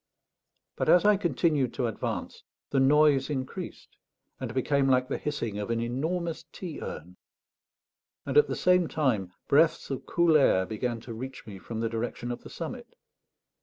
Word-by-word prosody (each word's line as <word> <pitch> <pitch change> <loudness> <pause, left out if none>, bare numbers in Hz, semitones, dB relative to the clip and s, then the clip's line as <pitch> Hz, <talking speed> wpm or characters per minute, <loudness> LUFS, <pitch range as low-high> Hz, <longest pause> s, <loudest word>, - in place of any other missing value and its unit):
But - - 0
as 180 - +6
I 210 0 +6
continued 165 - +1
to 125 - 0
advance, 115 - -4 0.3
the 135 - +2
noise 140 0 +4
increased, 130 -3 -6 0.4
and 130 -4 -4
became 135 +2 +1
like 130 -1 +3
the 140 - -2
hissing 115 -8 -3
of 105 - -4
an 115 0 0
enormous 160 +8 -2
tea 175 -5 -7
urn, 90 +4 -7 1.1
and 135 - -3
at 150 0 +6
the 135 - -2
same 180 -1 +3
time 115 - 0 0.2
breaths 155 0 +3
of 135 - -5
cool 170 -2 +4
air 95 -10 +4
began 115 +3 -3
to 115 - -8
reach 130 +3 -7
me 100 -3 -9
from 115 +3 -5
the 115 - +1
direction 120 +1 -3
of 120 - -5
the - - -11
summit. - - -6
130 Hz, 165 wpm, -28 LUFS, 115-150 Hz, 1.1 s, as